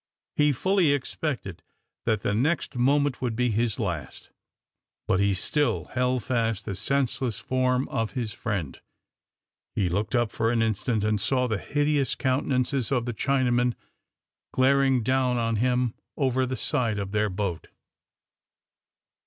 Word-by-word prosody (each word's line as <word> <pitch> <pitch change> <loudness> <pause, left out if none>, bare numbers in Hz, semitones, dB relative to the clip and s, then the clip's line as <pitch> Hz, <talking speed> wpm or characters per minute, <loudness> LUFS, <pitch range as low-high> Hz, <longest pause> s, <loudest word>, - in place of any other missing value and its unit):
He 150 0 +4
fully 180 +2 +2
expected 130 - -3 0.5
that 110 -2 +2
the 100 - 0
next 145 +10 0
moment 140 +2 +2
would 120 -3 -1
be 125 0 +1
his 110 0 0
last; 85 -9 -4 0.8
but 95 - +2
he 100 -1 +2
still 145 +10 +1
held 125 -1 +1
fast 115 -4 -1
the 100 - -3
senseless 125 +3 -1
form 130 0 0
of 115 -1 -2
his 120 -5 -3
friend. 100 - -4 0.9
He 95 -3 +1
looked 100 +8 -1
up 120 -2 +1
for 110 - 0
an 115 -1 +2
instant, 110 0 0
and 105 -1 +1
saw 125 +4 +2
the 110 -5 -1
hideous 145 -1 +1
countenances 130 -1 0
of 125 -3 +1
the 120 - -2
Chinamen 125 -1 +1 0.8
glaring 135 -1 +3
down 130 0 +2
on 115 -1 0
him 125 0 +1 0.2
over 130 -2 +1
the 130 0 -3
side 120 -8 0
of 100 -1 -3
their 105 0 +1
boat. 95 -3 -3
125 Hz, 145 wpm, -26 LUFS, 110-130 Hz, 0.9 s, He